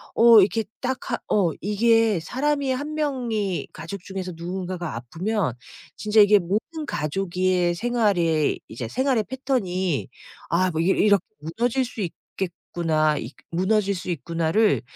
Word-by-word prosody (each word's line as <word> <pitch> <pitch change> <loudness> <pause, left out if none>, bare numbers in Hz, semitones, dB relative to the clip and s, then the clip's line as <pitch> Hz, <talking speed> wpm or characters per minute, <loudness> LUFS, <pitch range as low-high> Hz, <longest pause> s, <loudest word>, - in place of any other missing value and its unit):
어 230 -1 +8
이렇게 215 +3 +1 0.2
딱 260 0 -1
하 235 - +1
어 185 -5 +3
이게 220 -1 +3
사람이 275 - -1
1 290 +4 -3
명이 235 - -1
가족 185 +5 -7
중에서 190 -1 -5
누군가가 175 -1 -4
아프면 165 - -2 0.4
진짜 215 0 +2
이게 205 0 +7
모든 220 - -3
가족의 180 +3 0
생활에 185 -8 +1
이제 115 0 -6
생활의 260 - +1
패턴이 190 - -1 0.4
아 185 +2 +3
뭐 160 +1 -1
'이렇 190 +3 +2
이렇게 205 -2 +4 0.2
무너질 235 - -1
수 235 -2 -7
있겠구나. 165 -4 -2
이 115 +4 -6 0.2
무너질 200 +3 +1
수 175 - -6
있구나.'를 170 +6 +1
195 Hz, 280 characters per minute, -24 LUFS, 170-230 Hz, 0.4 s, 어